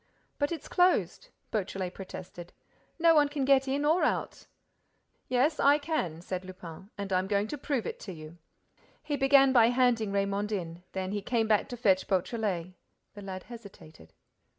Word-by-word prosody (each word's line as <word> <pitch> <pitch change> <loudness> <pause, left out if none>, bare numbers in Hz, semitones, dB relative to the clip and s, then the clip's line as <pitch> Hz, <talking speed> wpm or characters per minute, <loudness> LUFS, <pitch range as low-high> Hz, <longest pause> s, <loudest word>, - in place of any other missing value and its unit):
"But 285 +1 0
it's 330 -4 -5
closed," 365 +7 +2 0.2
Beautrelet 190 -3 -3
protested. 175 -2 -9 0.4
"No 335 0 +5
one 295 -2 +4
can 285 -2 -2
get 270 0 +4
in 280 +2 0
or 320 +4 +3
out." - - -2 0.8
"Yes, 265 +5 +1
I 285 +1 +5
can," 285 - -3
said 185 0 -4
Lupin; 185 0 -10
"and 200 -1 -4
I'm 185 +1 +1
going 200 0 +1
to 295 - -4
prove 265 -5 -2
it - - -5
to 195 - -8
you." 160 0 -11 0.6
He 295 - -2
began 270 -1 +5
by 235 -3 +6
handing 240 -4 +2
Raymonde 200 +1 -1
in. 170 -3 -5
Then 190 0 -3
he 205 0 -2
came 225 +2 0
back 215 -2 +2
to 245 - -6
fetch 195 -5 +2
Beautrelet. 190 -2 -1 0.4
The 205 - -10
lad 190 -1 -7
hesitated. 190 - -13
210 Hz, 170 wpm, -29 LUFS, 185-270 Hz, 0.8 s, by